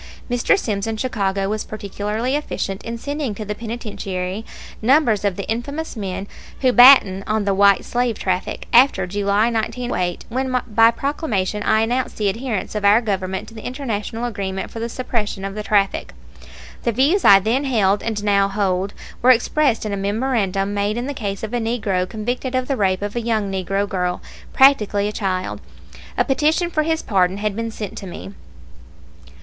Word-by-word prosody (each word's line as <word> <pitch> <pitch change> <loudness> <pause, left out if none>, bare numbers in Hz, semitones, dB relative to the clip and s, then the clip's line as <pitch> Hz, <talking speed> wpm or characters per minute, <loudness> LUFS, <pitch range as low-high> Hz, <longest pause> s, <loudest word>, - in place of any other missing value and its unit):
Mr. 245 +11 +3
Sims 210 - -2
in 225 -1 -2
Chicago 200 -5 -1
was 215 +1 -2
particularly 215 +4 -3
efficient 195 -9 -3
in 230 0 -5
sending 285 -3 -3
to 215 - -6
the 210 - -3
penitentiary 210 -4 -5 0.4
numbers 235 -4 +3
of 200 -3 0
the 200 - -6
infamous 280 +8 -4
men 195 -2 -4 0.3
who 255 -2 +3
batten 240 -7 +7
on 215 -1 0
the 200 - +2
"white 200 0 +4
slave" 245 -2 -1
traffic, 185 0 -2
after 240 -6 +5
July, 205 +4 +1
1908, 225 -5 -2
when 255 +1 0
by 225 0 +5
proclamation 230 - -2
I 220 +1 +2
announced 245 +3 -1
the 210 -2 +1
adherence 225 -1 -3
of 210 -1 -3
our 205 +2 +6
Government 190 -4 -3
to - - -15
the 220 - -9
international 240 -3 -4
agreement 195 -4 -4
for 230 - -7
the 230 +1 -3
suppression 220 -5 -3
of 195 - -4
the 210 - -4
traffic. 205 -2 0 0.7
The 235 - 0
views 285 - +2
I 195 - +9
then 230 +8 0
held 205 -6 +2
and 215 -2 -3
now 200 -1 +3
hold 195 -1 -1 0.3
were 250 - +4
expressed 255 0 +3
in 210 - -2
a - - -2
memorandum 200 -2 -1
made 205 +2 -1
in 240 - -2
the 285 - -3
case 200 -6 -4
of 220 +2 -5
a 240 - +1
Negro 210 -6 -1
convicted 245 +4 -3
of 255 0 0
the 275 - 0
rape 195 -4 0
of 205 +2 -4
a 240 - -1
young 220 -4 -1
Negro 195 +1 -1
girl, 180 -3 -2 0.3
practically 210 -7 +4
a - - -2
child. 185 -3 -3 0.6
A - - +3
petition 310 +5 +1
for 310 - +1
his 320 +1 -1
pardon 190 -2 +1
had 210 -1 -2
been 230 +1 -3
sent 215 -3 -6
me. 100 - -8
215 Hz, 180 wpm, -20 LUFS, 195-245 Hz, 0.7 s, I